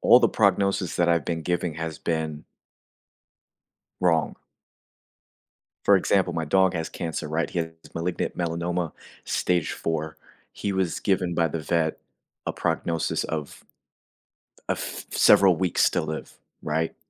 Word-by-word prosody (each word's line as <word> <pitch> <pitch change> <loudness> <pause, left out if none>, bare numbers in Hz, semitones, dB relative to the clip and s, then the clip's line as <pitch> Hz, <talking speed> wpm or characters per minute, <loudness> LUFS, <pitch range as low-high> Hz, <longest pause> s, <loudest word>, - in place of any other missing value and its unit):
all - - +8
the - - +4
prognosis 100 -3 +2
that 85 -1 +3
I've 85 -3 +1
been 80 -1 -2
giving 85 -1 -1
has 80 -1 -5
been 80 -2 -2 1.6
wrong. 85 -4 +2 1.5
For 100 - +7
example, 95 -1 +2
my 80 -1 -1
dog 95 +4 +3
has 80 -1 -2
cancer, 80 -3 -4
right, 80 +2 0
he - - -3
has 80 -1 -1 0.2
malignant 85 +1 -2
melanoma 85 0 -1 0.3
stage 90 -3 0
4. 80 -1 -3 0.4
He 100 - -3
was 95 -3 -1
given 90 -3 +1
by 85 -1 +2
the 80 +1 -3
vet 80 0 0 0.5
a - - 0
prognosis 85 -1 -1
of 75 -2 -5 1.1
a - - +2
th - - -6
several 95 -3 +6
weeks 90 +1 +1
still - - +2
live, 80 0 -6 0.2
right? 80 0 -1
85 Hz, 135 wpm, -25 LUFS, 80-90 Hz, 1.6 s, all